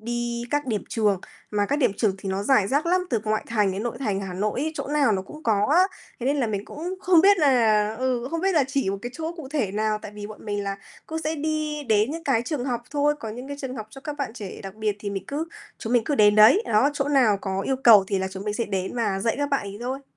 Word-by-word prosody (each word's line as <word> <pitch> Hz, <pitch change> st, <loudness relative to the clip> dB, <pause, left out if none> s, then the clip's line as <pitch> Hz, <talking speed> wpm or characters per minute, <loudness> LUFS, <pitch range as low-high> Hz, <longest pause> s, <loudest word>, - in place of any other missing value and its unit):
đi 235 Hz, +1 st, -3 dB
các 290 Hz, -1 st, 0 dB
điểm 215 Hz, -4 st, -1 dB
trường, 205 Hz, -4 st, +1 dB, 0.3 s
mà 205 Hz, -1 st, +1 dB
các 285 Hz, -, 0 dB
điểm 245 Hz, -8 st, +3 dB
trường 205 Hz, -4 st, +1 dB
thì 195 Hz, 0 st, -6 dB
nó 190 Hz, +1 st, -1 dB
rải 210 Hz, -4 st, +3 dB
rác 285 Hz, +5 st, +1 dB
lắm, 365 Hz, +2 st, +3 dB
từ 230 Hz, -3 st, +1 dB
ngoại 215 Hz, 0 st, 0 dB
thành 210 Hz, -4 st, +1 dB
đến 200 Hz, +3 st, -4 dB
nội 240 Hz, 0 st, -3 dB
thành 205 Hz, -7 st, -1 dB
Hà 190 Hz, -2 st, -5 dB
Nội 210 Hz, +6 st, -1 dB
ấy, 315 Hz, +2 st, -1 dB
chỗ -, -, -4 dB
nào 285 Hz, -6 st, +3 dB
nó 190 Hz, -1 st, 0 dB
cũng 305 Hz, +10 st, -12 dB
có 210 Hz, -2 st, +2 dB
á. 365 Hz, -, +7 dB, 0.4 s
Thế 245 Hz, -, -2 dB
nên 285 Hz, -, +2 dB
là 265 Hz, -4 st, +1 dB
mình 205 Hz, -2 st, -3 dB
cũng 345 Hz, -, -5 dB
không 360 Hz, -4 st, +5 dB
biết 395 Hz, +1 st, +6 dB
là 220 Hz, -7 st, +3 dB
ừ, 255 Hz, -1 st, -1 dB
không 330 Hz, -, -2 dB
biết 385 Hz, +2 st, +2 dB
là 295 Hz, -, +4 dB
chỉ 270 Hz, -7 st, 0 dB
một 195 Hz, -, -3 dB
cái 245 Hz, -, -4 dB
chỗ 325 Hz, +3 st, -4 dB
cụ 300 Hz, -6 st, -8 dB
thể 265 Hz, -10 st, -1 dB
nào, 215 Hz, 0 st, 0 dB
tại 210 Hz, -, -8 dB
vì 205 Hz, 0 st, -6 dB
bọn 215 Hz, 0 st, -11 dB
mình 205 Hz, -1 st, -2 dB
là 195 Hz, 0 st, -3 dB, 0.3 s
cũng 320 Hz, -, -4 dB
sẽ 320 Hz, 0 st, -2 dB
đi 305 Hz, 0 st, -2 dB
đến 215 Hz, +4 st, +3 dB
những 330 Hz, +1 st, -6 dB
cái 245 Hz, -6 st, +2 dB
trường 285 Hz, -4 st, -3 dB
học 240 Hz, -3 st, -2 dB
thôi, 295 Hz, 0 st, +2 dB
có 220 Hz, -, -5 dB
những 250 Hz, +5 st, -8 dB
cái 285 Hz, -, -5 dB
trường 260 Hz, -1 st, -5 dB
học 215 Hz, -, -6 dB
cho 270 Hz, -, -11 dB
các 295 Hz, 0 st, -6 dB
bạn 275 Hz, -6 st, -3 dB
trẻ 205 Hz, -6 st, -8 dB
đặc 195 Hz, 0 st, -8 dB
biệt 215 Hz, -1 st, -1 dB
thì 205 Hz, -1 st, -5 dB
mình 195 Hz, -1 st, -4 dB
cứ 295 Hz, +3 st, -2 dB, 0.3 s
chúng 225 Hz, -, -4 dB
mình 235 Hz, -3 st, +3 dB
cứ 295 Hz, -, 0 dB
đến 210 Hz, -4 st, +5 dB
đấy. 225 Hz, -, +7 dB
Đó, 225 Hz, +6 st, +3 dB
chỗ 280 Hz, 0 st, -1 dB
nào 245 Hz, -8 st, +4 dB
có 195 Hz, -1 st, -2 dB
yêu 265 Hz, +6 st, -1 dB
cầu 225 Hz, -7 st, +7 dB
thì 195 Hz, -, 0 dB
là 190 Hz, 0 st, -2 dB
chúng 190 Hz, +1 st, -8 dB
mình 210 Hz, 0 st, -2 dB
sẽ 235 Hz, -, -1 dB
đến 190 Hz, -1 st, -3 dB
và 215 Hz, -5 st, 0 dB
dạy 225 Hz, +4 st, 0 dB
các 285 Hz, 0 st, 0 dB
bạn 275 Hz, -, +2 dB
ấy 200 Hz, +1 st, -7 dB
thôi. 260 Hz, +3 st, -4 dB
235 Hz, 290 wpm, -24 LUFS, 205-285 Hz, 0.4 s, á